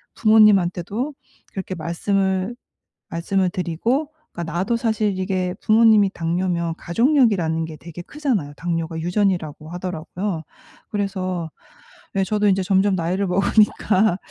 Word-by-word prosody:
부모님한테도 215 - +3 0.4
그렇게 190 -1 -4
말씀을 190 +5 -1 0.5
말씀을 185 +3 0
드리고 210 - -1 0.2
그러니까 170 -1 -5
나도 190 +7 0
사실 220 -4 0
이게 185 -1 -1
부모님이 215 -3 +5
당뇨면 170 0 -1
가족력이라는 195 - +2
게 160 -1 -9
되게 170 +2 -9
크잖아요. 235 - -2
당뇨가 165 -1 -3
유전이라고 175 -4 -1
하더라고요. 180 0 -4 0.5
그래서 185 -4 -2 0.7
예 195 - +2
저도 210 +1 +1
인제 195 -1 +3
점점 190 +1 +2
나이를 185 +3 -1
먹으니까 200 0 +3
185 Hz, 325 characters per minute, -22 LUFS, 170-210 Hz, 0.7 s, 부모님이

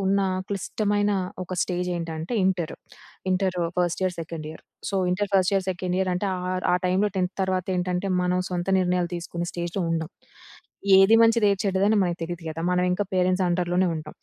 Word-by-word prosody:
ఉన్న 200 +1 +3 0.3
క్లిష్టమైన 205 +1 0 0.3
ఒక 185 0 -5
స్టేజ్ 180 0 -2
ఏంటంటే 165 +4 -4
inter. 180 -4 0 0.6
Inter 185 -1 +1 0.2
first 175 0 0
year, 185 -1 0
second 160 -1 -6
year. 160 - -11 0.3
So, - - -4 0.2
inter 205 +3 -1
first 190 0 +3
year, 195 -1 +1
second 180 0 -2
year 190 -1 +1
అంటే 180 +3 -1
ఆహ్, 180 0 -4 0.2
ఆ - - +5
టైమ్‌లో 195 +3 +2
10థ్ 180 0 0
తర్వాత 185 -1 -1
ఏంటంటే, 180 +2 -1
మనం 180 0 +1
సొంత 175 +1 -2
నిర్ణయాలు 180 -1 0
తీసుకునే 170 0 -4
స్టేజ్‌లో 175 +2 -3
ఉండం. 160 0 -2 0.9
ఏది 195 +4 +7
మంచిది 225 -2 +4
ఏది 195 - -3
చెడ్డది 195 +1 +2
అని 220 - +4
మనకు 175 -1 -2
తెలియదు 175 0 -6
కదా. 160 +1 -6
మనం 180 0 +2
ఇంకా 190 +3 0
స్టేజ్‌లో 190 - -3
పేరెంట్స్ 185 +1 +2
అండర్‌లోనే 180 +1 +1
ఉంటాం. 155 -1 -8
180 Hz, 185 wpm, -25 LUFS, 175-195 Hz, 0.9 s, ఏది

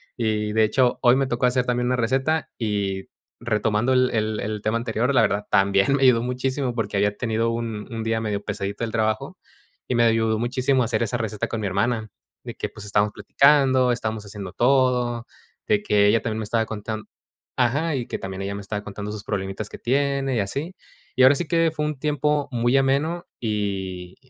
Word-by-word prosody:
Y 105 -2 -1
de 110 0 +4
hecho, 125 +3 +2
hoy 125 0 +6
me 135 0 +2
tocó 125 0 +1
hacer 125 0 +1
también 125 0 0
una 125 - +2
receta. 135 +7 0
Y, 100 -3 -2 0.3
retomando, 110 +1 +1
el 125 0 +3
el 110 -2 -1
el 105 0 -3
tema 110 +2 +1
anterior, 120 +3 -1
la 125 - +5
verdad 105 -1 +1
también 100 +6 +3
me 140 - -1
ayudó 120 -3 +5
muchísimo, 125 +1 -2
porque 105 -3 -2
había 105 +1 +1
tenido, 115 -1 0
un 115 -2 -4
un 115 - -3
día 110 0 0
medio 105 -2 -2
pesadito 100 +2 -4
del 110 - -2
trabajo, 110 0 -1 0.5
y - - -1
me 120 - +3
ayudó 110 -1 +2
muchísimo 130 +2 +1
hacer 115 0 0
esa 120 +2 -1
receta 110 -3 -2
con 115 -2 -4
mi 100 - -1
hermana, 110 +3 -1 0.3
de - - -7
que, - - -3
pues, 105 -1 -11
estábamos 105 +1 +1
platicando, 135 -3 +4
estábamos 110 -3 -3
haciendo 100 -2 -8
todo, 125 0 +2 0.4
de 210 -1 +2
que 105 - +3
ella 115 +2 +3
también 110 -1 -3
me 110 - -3
estaba 110 +1 0
contand 110 0 -5 0.5
Ajá, 145 +6 +1
y 125 -3 -3
que - - -4
también 95 0 -6
ella 100 +1 -3
me 100 - -5
estaba 105 +1 -5
contando 105 +1 -6
sus 105 -1 -7
problemitas 95 +1 -4
que - - -9
tiene, 135 0 0
y - - +1
así. 140 - -3 0.4
Y, 130 - +2
ahora 135 +2 +7
sí, 175 - -2
que 165 -1 +3
fue 150 -1 -2
un 150 -3 -3
tiempo, 150 -1 0
muy 120 +2 +1
ameno, 145 +6 +1
y 95 -5 -3
115 Hz, 205 wpm, -23 LUFS, 105-130 Hz, 0.5 s, ahora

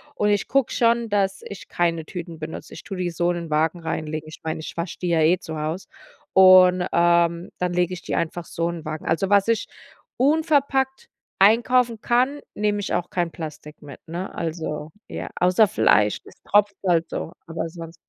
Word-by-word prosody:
Und 210 - +1
ich 205 -1 +1
gucke 275 -2 +1
schon, 235 -1 +2
dass 195 -2 0
ich 200 - -10
keine 165 -2 0
Tüten 170 -2 -7
benutze. 155 0 -7
Ich - - -10
tue 195 - -6
die 180 -1 -2
so 175 +1 0
in - - -2
den 170 -1 -6
Wagen 160 +3 +1
reinlegen, 155 -1 -4
ich 155 - -11
meine, 160 -1 -3
ich - - -8
wasche 170 +1 -4
die 180 - -2
ja 165 -2 +2
eh 165 +4 +4
zu 160 -4 -7
Hause, 155 +5 -4 0.5
und, 185 -1 +7
ähm, 170 0 +2
dann 180 -1 -1
lege 180 0 +1
ich 170 - -10
die - - -5
einfach 170 +1 -2
so 170 0 -2
in 170 -2 -6
Wagen. 155 0 -5
Also, 175 +4 0
was 200 0 +4
ich 230 -1 +1 0.5
unverpackt 275 -2 +1 0.3
einkaufen 230 +3 +4
kann, 255 +4 +1
nehme 210 0 0
ich 205 - -3
auch 175 0 -2
kein 175 -4 0
Plastik 155 -2 -9
mit, 145 -1 -11
ne? 175 +4 -5
Also, 160 -2 -4 0.2
ja, - - -6
außer 180 +4 +4
Fleisch, 105 - +3
das - - -15
tropft 205 -1 +3
halt 170 -2 +2
so, 165 - -5
aber 165 0 -3
sonst 165 -1 -9
175 Hz, 195 wpm, -23 LUFS, 165-205 Hz, 0.5 s, und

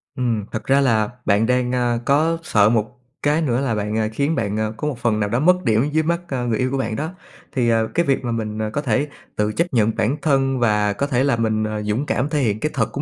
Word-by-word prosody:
Ừm, 120 -6 -1
thật 110 - -4
ra 135 +1 +3
là 110 -5 +2 0.2
bạn 100 +3 +3
đang, 125 0 +1
ơ, 120 -2 0
có 160 +4 +2
sợ 105 -10 +3
một 110 +1 -1 0.3
cái 150 +2 +2
nữa 130 -5 0
là 130 -5 0
bạn, 105 0 -2
ờ, 110 -1 +1
khiến 145 +7 0
bạn, 105 -4 -1
ờ, 110 0 -1
có 150 - -3
một 140 - -3
phần 115 -3 +1
nào 105 -1 0
đó 120 +4 0
mất 180 +5 +3
điểm 115 +3 +2
dưới 160 +1 +2
mắt, 170 +2 0
ờ, 130 -5 -2
người 115 -2 0
yêu 130 0 0
của 135 - -1
bạn 115 -4 -2
đó. 155 +7 -3 0.4
Thì, 120 -3 +1
ờ, 115 -1 +2
cái 170 - +2
việc 135 -3 +1
mà 120 - -1
mình, 110 -2 -3
ờ, 110 0 -1
có 145 +7 -2
thể 140 +2 0 0.3
tự 105 0 0
chấp 170 +8 -1
nhận 110 -2 +3
bản 130 +7 0
thân 135 -3 +1
và 105 -3 +2
có 140 +7 -2
thể 130 -2 +1
là 140 -3 +2
mình, 110 -1 0
ờ, 110 0 -3
dũng 105 +7 -1
cảm 140 0 -1
thể 150 -1 0
hiện 110 -6 0
cái 155 - -1
thật 115 -5 0
của 140 - -3
120 Hz, 275 wpm, -21 LUFS, 110-140 Hz, 0.4 s, ra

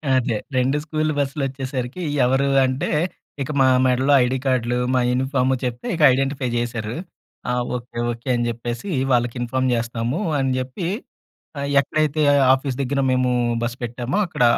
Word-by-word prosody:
అదే. 120 -3 +1 0.2
2 130 +3 +2
స్కూల్ 155 0 -1
బస్సులొచ్చేసరికి 135 0 -3 0.2
ఎవరు 135 +2 +2 0.2
అంటే? 130 +2 -1 0.5
ఇక 140 - -2
మా 130 - +6 0.2
మెడలో 130 +2 +2
ఐడీ 125 +2 0
కార్డులు, 125 -2 +1 0.2
మా 130 - +3
యూనిఫార్మ్ 130 +1 +1
చెప్తే, 120 -1 -3
ఇక 165 - -4
ఐడెంటిఫై 135 0 -1
జేసారు. 115 -2 -2 0.6
"ఆ! - - 0 0.2
Okay, 120 -1 -8
okay." 120 +3 -7
అని 120 0 0
జెప్పేసి, 120 - -5 0.2
"వాళ్ళకి 120 -1 +2
ఇన్ఫార్మ్ 130 +2 0
జేస్తాము." 120 - -2 0.2
అని 135 -1 +1
జెప్పి 130 +7 -4 0.7
ఆహ్, 140 0 -2
ఎక్కడైతే 155 +1 0 0.3
ఆఫీస్ 135 0 -3
దగ్గర 140 +1 -1
మేము 130 0 +2 0.3
బస్ 120 0 -2
పెట్టామో, 120 +6 -3
అక్కడ 160 - -3
130 Hz, 145 wpm, -22 LUFS, 120-135 Hz, 0.7 s, మా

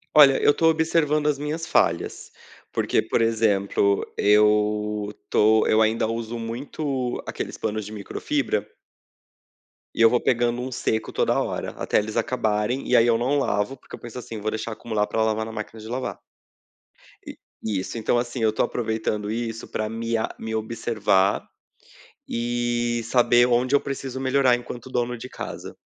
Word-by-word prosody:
Olha, 140 -3 +7
eu 145 - +5
tô 165 - +2
observando 155 -2 +2
as 150 -2 +2
minhas 150 +3 -3
falhas, 85 0 0 0.4
porque, - - +1
por - - 0
exemplo, 100 -3 +2
eu 105 0 +2 0.2
tô 110 +1 +4
eu 110 - +4
ainda 110 0 +2
uso 115 +1 -4
muito 125 +2 -3
aqueles - - -5
panos 110 0 -3
de 105 - -8
microfibra 110 - -2 1.3
e - - -1
eu 115 - +8
vou 125 +1 +2
pegando 120 0 +1
um 130 +1 -5
seco 110 -2 -1
toda - - +2
hora, - - -3
até - - -1
eles 105 +2 -1
acabarem, 115 +1 0
e 125 - +3
aí 115 - +6
eu 115 -1 +4
não 130 +5 +1
lavo, 105 +1 -1
porque - - -11
eu - - -15
penso 120 +1 -8
assim: 115 -2 -7
"Vou 110 +1 -1
deixar 110 +1 -4
acumular 110 -2 -2
para 110 - -1
lavar 110 0 0
na 110 - -7
máquina 110 0 -7
de 110 - -9
lavar". 125 +2 -4 1.1
E - - -8 0.3
isso. 105 0 -3
Então 115 +2 +1
assim, 120 +1 -2
eu 110 -1 +2
tô - - +1
aproveitando 110 -2 -2
isso 115 0 -4
pra 110 0 -3
me 115 +1 -2
a 110 - -1
me 110 0 -4
observar 110 -3 +1 0.8
e 120 0 -1
saber 120 0 +4
onde 125 +2 +2
eu 145 - +5
preciso 135 -1 -5
melhorar 130 -1 +3
enquanto 120 +1 -8
dono 125 -1 -1
de 120 +2 -8
casa. - - -7
115 Hz, 165 wpm, -24 LUFS, 110-125 Hz, 1.3 s, eu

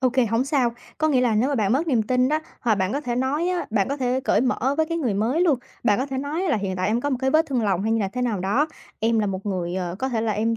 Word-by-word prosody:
Ô 255 - +3
kê, 255 -1 +2
hổng 230 +4 +1
sao, 260 -5 +1 0.2
có 310 - +2
nghĩa 260 -4 +3
là 240 -3 +2
nếu 240 +6 +2
mà 285 - 0
bạn 215 -3 +1
mất 310 +6 +1
niềm 245 -7 +2
tin 250 +3 +2
đó 310 - +2 0.2
hoặc 230 -3 +2
bạn 190 0 -1
có 280 - -1
thể 245 -4 -3
nói 290 +7 0
á, 360 -1 -1
bạn 205 -3 +1
có 280 - -2
thể 255 -1 0
cởi 210 - +3
mở 260 +1 +1
với 315 0 +2
cái 335 0 -2
người 245 -10 0
mới 230 - +1
luôn, 310 -8 +3 0.3
bạn 210 -2 +3
có 265 - -1
thể 265 -1 -4
nói 295 +6 -2
là 285 - +2
hiện 195 -2 -3
tại 185 +1 0
em 225 +3 +1
có 285 +3 -1
một 260 - +1
cái 265 0 +1
vết 320 +2 +3
thương 255 -4 -1
lòng 195 -2 +1
hay 220 +1 0
như 225 - +1
là 195 - 0
thế 250 +5 -4
nào 220 -6 -1
đó, 225 +11 +1 0.3
em 225 +1 +2
là 210 - +1
một 195 +1 -4
người, 180 -3 -2
ờ, 180 -2 -3
có 265 - -1
thể 230 -3 -1
là 220 -1 0
em 225 +2 0
245 Hz, 335 wpm, -23 LUFS, 210-275 Hz, 0.3 s, Ô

